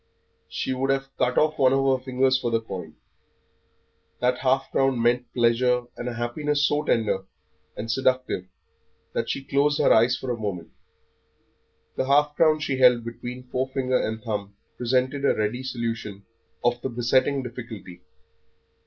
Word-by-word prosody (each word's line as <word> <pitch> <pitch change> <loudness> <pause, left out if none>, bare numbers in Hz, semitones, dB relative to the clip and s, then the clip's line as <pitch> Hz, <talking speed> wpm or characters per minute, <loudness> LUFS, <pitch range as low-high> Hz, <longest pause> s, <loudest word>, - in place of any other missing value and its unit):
She 130 - -2
would 135 +1 -1
have 135 0 -1
cut 125 -1 0
off 155 0 +2
one 130 -1 +5
of 135 0 +2
her - - -22
fingers 130 0 +2
for 130 -2 0
the 115 -1 +1
coin. 90 -8 -8 1.2
That 125 0 +1
half 135 +1 +1
crown 135 -2 +2
meant 120 +1 +1
pleasure 125 +1 +2
and 120 - -4
a 120 - -6
happiness 145 +5 0
so 145 0 +1
tender 110 -8 0 0.5
and 115 +2 -3
seductive 130 -7 0 0.7
that - - -2
she 135 - -2
closed 145 +1 +2
her - - +5
eyes 120 +3 +4
for 130 - -4
a 120 - -3
moment. 95 -6 -4 1.3
The 130 - 0
half 145 +1 +3
crown 155 -1 +4
she 135 -3 -1
held 125 -2 +5
between 120 +2 -7
forefinger 130 0 0
and 110 0 -3
thumb 100 -2 -4 0.2
presented 130 +3 0
a 140 - +3
ready 110 +4 -1
solution 115 -6 -4 0.4
of 120 0 +1
the 135 - -2
besetting 130 +3 +1
difficulty. 115 -7 -9
125 Hz, 155 wpm, -25 LUFS, 115-135 Hz, 1.3 s, one